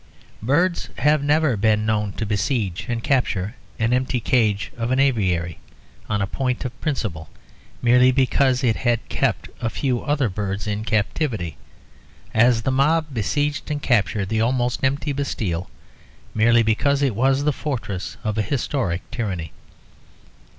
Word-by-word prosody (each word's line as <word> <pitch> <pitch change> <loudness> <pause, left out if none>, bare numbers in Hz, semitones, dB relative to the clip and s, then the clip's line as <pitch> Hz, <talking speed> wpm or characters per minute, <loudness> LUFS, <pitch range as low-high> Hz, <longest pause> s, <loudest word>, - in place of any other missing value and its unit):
Birds 170 - +1
have 150 0 +3
never 150 -2 +3
been 105 +1 +2
known 105 -2 0
to 110 - -3
besiege 105 -1 -1
and 115 -1 -2
capture 110 -7 0 0.2
an 115 +1 +1
empty 130 0 +1
cage 105 -4 +1
of 115 0 -2
an 130 +1 +1
aviary, 95 - +1 0.5
on 105 -2 +1
a - - +1
point 125 +5 -2
of 125 - -6
principle, 105 - -3 0.5
merely 125 +1 +6
because 130 0 +2
it 115 -3 +2
had 120 -2 0
kept - - 0
a 115 - 0
few 125 +1 -1
other 145 -3 +1
birds 100 0 -3
in 105 0 -2
captivity, 110 - -1 0.8
as 115 0 +4
the 130 - +1
mob 150 +3 +2
besieged 145 +6 -1
and 150 -1 -3
captured 100 -4 +1
the 110 0 +1
almost 125 +1 0
empty 140 +2 0
Bastille, 100 -11 -2 0.6
merely 115 +1 +4
because 140 +6 +2
it 135 -4 +2
was 135 +5 +2
the 150 0 +2
fortress 110 - -4
of 110 0 -1
a - - +4
historic 110 - -1
tyranny. 100 - -3
120 Hz, 150 wpm, -22 LUFS, 105-135 Hz, 0.8 s, merely